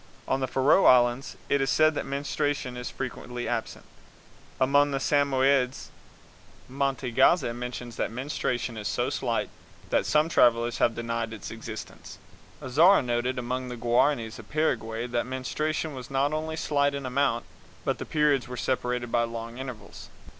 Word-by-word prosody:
On 135 - +1
the 130 - -1
Faroe 135 +9 +4
Islands 120 +1 +4
it 140 -1 +2
is 135 - +1
said 155 +3 +4
that - - -4
menstruation 140 -2 -2
is 125 0 -5
frequently 125 -2 -5
absent. 115 -2 -3 0.7
Among 140 +2 +4
the 140 - -1
Samoyeds, 135 -2 +2 0.8
Mantegazza 135 +1 +2
mentions 120 -1 -6
that - - -1
menstruation 120 -2 -3
is 105 -1 -4
so - - -1
slight - - -1 0.4
that - - +2
some 155 +1 +3
travelers 120 -6 +3
have 115 - +2
denied 115 -1 -3
its 95 -6 -7
existence. 110 -1 -8 0.5
Azara 160 +8 +5
noted 125 +1 -1
among 125 +1 -3
the 125 - -6
Guaranis 120 -1 +1
of 110 - -13
Paraguay 115 -7 -1
that 120 0 -2
menstruation 150 +4 -2
was 130 -2 -8
not 140 +2 +1
only 160 +1 -2
slight 145 -2 +1
in 140 -1 -5
amount, 135 +2 0 0.4
but - - 0
the - - -3
periods 150 -4 +2
were 125 0 -7
separated 125 -2 -1
by 120 - +3
long 115 +1 -6
intervals. 130 -4 -8
130 Hz, 155 wpm, -27 LUFS, 120-140 Hz, 0.8 s, Azara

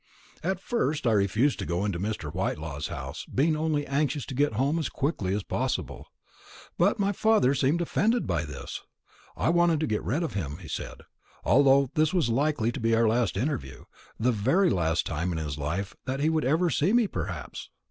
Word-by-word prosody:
At 185 +2 -1
first 160 - -1
I 115 - +4
refused 110 +7 +2
to - - -3
go 90 +3 -1
into 95 -5 -2
Mr. 95 -6 -3
Whitelaw's 80 -5 -3
house, - - -6
being 155 +4 +1
only 155 -2 0
anxious 145 0 -1
to - - -7
get 145 0 +1
home 140 +8 +1
as 160 - -2
quickly 135 - -2
as 105 - -2
possible. - - -3 0.7
But 195 +6 +3
my 200 -1 +1
father 210 - +3
seemed 140 +5 +1
offended 225 +7 +1
by 85 -2 -1
this. 75 - -7 0.6
I - - +1
wanted 170 -2 +3
to - - +2
get 110 -5 -1
rid 155 +8 -1
of 165 - -3
him, 75 -7 -3
he 90 -3 -11
said, - - -6 0.4
although 140 -1 +4
this 155 +3 +2
was 165 -10 +2
likely 130 -2 +1
to 125 - -6
be 115 -1 +2
our 115 0 +3
last 115 -4 +1
interview 130 - -3 0.4
the 125 +3 +3
very 135 - +2
last 85 -2 +1
time 85 +3 -2
in 85 - -2
his 75 -2 -4
life 85 +7 -3
that 130 +1 -2
he 155 +3 +2
would 155 -3 0
ever 165 +5 +2
see 170 +8 +2
me, 240 -1 +4
perhaps. - - -5
135 Hz, 200 wpm, -27 LUFS, 100-155 Hz, 0.7 s, I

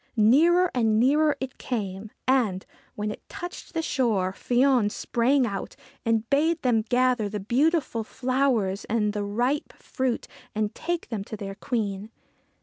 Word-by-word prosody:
Nearer 330 +12 +5
and 225 -3 +2
nearer 295 +5 +3
it 260 -1 -6
came, 205 -4 -4 0.2
and, 230 -8 +2 0.3
when 210 0 -2
it - - -8
touched 350 0 -8
the 325 - 0
shore, 215 - +1
Fion 245 -1 +2
sprang 250 +5 +1
out, 200 -4 -4 0.3
and 225 -1 +1
bade 315 +5 +2
them 240 -4 +3
gather 245 -1 +1
the 210 0 -4
beautiful 260 - +1
flowers 250 -5 0
and 210 -2 0
the 210 -1 -2
ripe 245 +8 -1
fruit 260 -2 -3 0.3
and 215 -1 -1
take 345 0 -3
them 220 -4 -3
to 215 - -7
their 195 -1 -5
Queen. 205 -1 -3
235 Hz, 145 wpm, -26 LUFS, 210-265 Hz, 0.3 s, Nearer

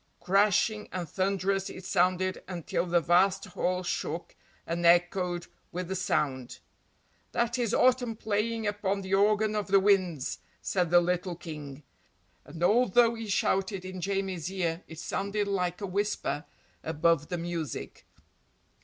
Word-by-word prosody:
Crashing 210 +2 +2
and 180 -2 -4
thunderous 195 +2 0
it 185 - -9
sounded 185 +1 +1
until 175 0 -2
the 175 0 +3
vast 185 +4 +3
hall 185 -1 -1
shook 170 -1 -3 0.3
and 170 +1 -2
echoed 175 0 +3 0.3
with 180 0 -4
the 190 - -2
sound. 135 -8 -1 0.8
"That 235 +1 0
is 235 -3 0
Autumn 250 -2 +3
playing 220 +1 -1
upon 205 -1 -1
the 190 0 -4
organ 210 +2 +3
of 210 -1 -1
the 195 0 +5
winds," 185 -8 +1 0.2
said 180 -3 0
the 175 +1 +6
little 180 0 -1
King, 150 -4 -8 0.6
and 165 +1 -7
although 235 +3 +4
he 225 -1 -6
shouted 195 -1 0
in 185 -1 -6
Jamie's 190 -3 -2
ear 175 -2 -2
it 160 - -10
sounded 200 +5 -2
like 180 -2 -1
a - - -2
whisper 200 -5 -2 0.4
above 160 -1 +1
the 175 - -3
music. 165 -5 -5
185 Hz, 140 wpm, -29 LUFS, 175-200 Hz, 0.8 s, the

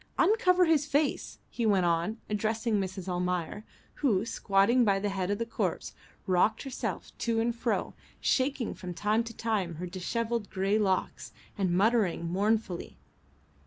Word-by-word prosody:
Uncover 365 -2 +4
his 305 -3 +2
face," 290 +1 0
he 240 - -3
went 200 -5 +3
on, 170 +6 0
addressing 215 +1 0
Mrs. 190 -1 -5
Almayer, 180 +2 -2 0.4
who, 220 -8 +2
squatting 215 +3 +3
by 200 -3 +3
the 205 +1 -1
head 190 -2 -2
of 205 - 0
the 230 - -2
corpse, 230 - -3 0.3
rocked 190 +4 +2
herself 270 -2 -5
to 230 -1 0
and 235 +1 0
fro, 230 0 -1 0.3
shaking 260 -2 0
from 180 -2 -7
time 215 +5 +1
to 230 -1 -9
time 205 -7 -1
her 175 +4 -5
dishevelled 220 +5 -3
grey 195 +2 +1
locks, 190 -3 -1 0.2
and 195 -3 0
muttering 205 -5 +2
mournfully. 200 +1 -1
210 Hz, 150 wpm, -29 LUFS, 185-235 Hz, 0.4 s, Uncover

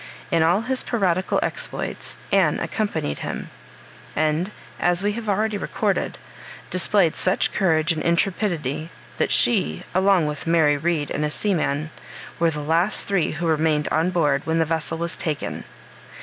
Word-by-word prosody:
In 165 -2 +3
all 175 +6 +3
his 255 +2 -2
piratical 185 -5 0
exploits - - -4
Anne - - +3
accompanied 205 - -2
him; - - -5 0.6
and, 155 +5 +1 0.3
as 175 +1 +1
we 205 - +2
have 220 0 -5
already 210 +1 0
recorded, - - -1 0.5
displayed 185 -2 +3
such 185 - 0
courage 165 -4 +2
and 160 - -1
intrepidity, 170 -4 0 0.3
that - - +1
she, 80 +2 +2
along 190 -2 +4
with 150 +1 -4
Mary 160 -3 +4
Read 155 0 -1
and 150 - -1
a 150 - +1
seaman, 155 -4 -1 0.5
were 170 0 +4
the 150 -2 -4
last 165 +7 +2
three 195 -5 +1
who 175 - -3
remained 155 -2 +1
on 160 +3 +1
board 150 -6 +2
when 160 0 0
the 165 - +3
vessel 165 0 -2
was 170 0 -2
taken. 150 -3 -3
165 Hz, 150 wpm, -23 LUFS, 155-190 Hz, 0.6 s, along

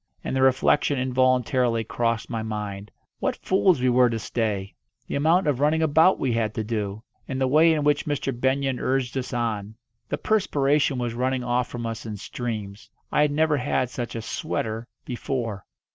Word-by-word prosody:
And - - -3
the 130 - +1
reflection 130 +2 +3
involuntarily 125 -2 +2
crossed 115 0 -1
my 115 -2 -3
mind 105 -2 -5 0.3
what - - 0
fools 185 -4 +3
we 130 0 +2
were 125 0 +5
to 115 - -2
stay! 105 -4 -2 0.3
The - - -7
amount 165 +6 +3
of 145 -4 +1
running 155 +3 +2
about 160 +4 +5
we 130 -3 0
had 110 -2 -1
to 110 - -1
do! 105 -1 -3 0.2
And 130 -1 -3
the 130 - +2
way 155 +5 +5
in 155 -2 +1
which 150 +1 +1
Mr. 140 -2 -1
Benyon 130 +1 0
urged 130 -2 -1
us 130 -1 -3
on! 110 -4 -2 0.3
The - - -1
perspiration 145 -9 +1
was 120 -2 -2
running 130 +1 -1
off 125 0 0
from 120 -1 -6
us 115 -1 -4
in 105 -1 -5
streams 105 -2 -6 0.2
I - - +3
had 150 - +4
never 155 0 +2
had 125 -1 0
such 120 -2 -5
a 115 - -4
"sweater" 115 0 -3 0.2
before! 120 -5 -3
125 Hz, 185 wpm, -25 LUFS, 115-140 Hz, 0.3 s, were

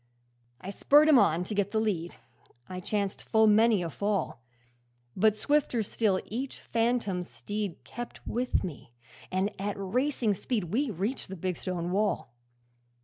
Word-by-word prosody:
'I 195 - -5
spurred 295 +9 +5
him 285 -5 +8
on 165 -2 +3
to 200 - -5
get 200 -1 +1
the 220 - 0
lead, 180 -6 -1 0.5
I 185 0 -6
chanced 200 +1 -2
full 220 0 +3
many 215 -2 +5
a 170 - -3
fall; 200 - -1 0.7
But 215 +2 +4
swifter 260 -1 +1
still 200 -2 +1
each 255 +5 -5
phantom 230 -5 0
steed 205 +1 -5
Kept 240 0 -8
with 245 +2 0
me, 145 -8 -7 0.4
and 190 +3 0
at 205 0 -2
racing 235 +3 0
speed 200 -3 -3
We 275 +3 +1
reached 205 +6 -2
the 190 - -7
big 180 +1 -2
stone 175 -1 -3
wall. 200 - 0
205 Hz, 150 wpm, -29 LUFS, 185-230 Hz, 0.7 s, him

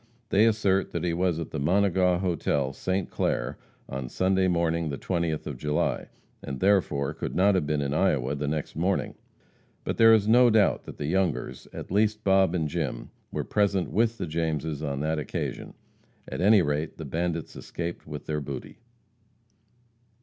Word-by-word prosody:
They 105 +3 +5
assert 100 -3 +1
that 85 - -2
he 85 -1 0
was 90 -1 +1
at 80 -2 -5
the 75 - -3
Monegaw 90 +2 +3
hotel, 70 -6 0
St. 95 +4 -2
Clair, - - -1 0.3
on 65 -2 -5
Sunday 95 +3 +2
morning, 85 -2 +1
the 70 - -3
20th 85 -3 -2
of 70 - -5
July, 75 +1 -1 0.3
and 70 -1 -6
therefore 85 -8 +2
could - - -5
not 100 +3 +4
have 90 -6 0
been 75 -1 0
in 70 0 -2
Iowa 75 -7 +1
the 75 0 -3
next 75 0 -3
morning. 90 +5 0 0.7
But - - -3
there 115 0 +7
is 110 -2 +4
no 120 +2 +6
doubt 110 -2 +3
that - - -9
the 75 - -4
Youngers 90 +1 -1
at - - -8
least 105 +2 +1
Bob 95 -2 +3
and 80 -3 0
Jim 80 -3 -3 0.2
were - - -2
present 100 -3 +1
with 115 +1 +1
the - - -3
Jameses 80 -2 -2
on 70 -2 -2
that 80 +1 0
occasion. 75 - -4 0.5
At - - -5
any 100 0 +6
rate, 75 +1 -2
the 80 - -6
bandits 85 +2 -3
escaped 85 -1 -6
with 75 -1 -7
their 75 -1 -2
booty. 70 -2 -7
85 Hz, 175 wpm, -27 LUFS, 75-95 Hz, 0.7 s, there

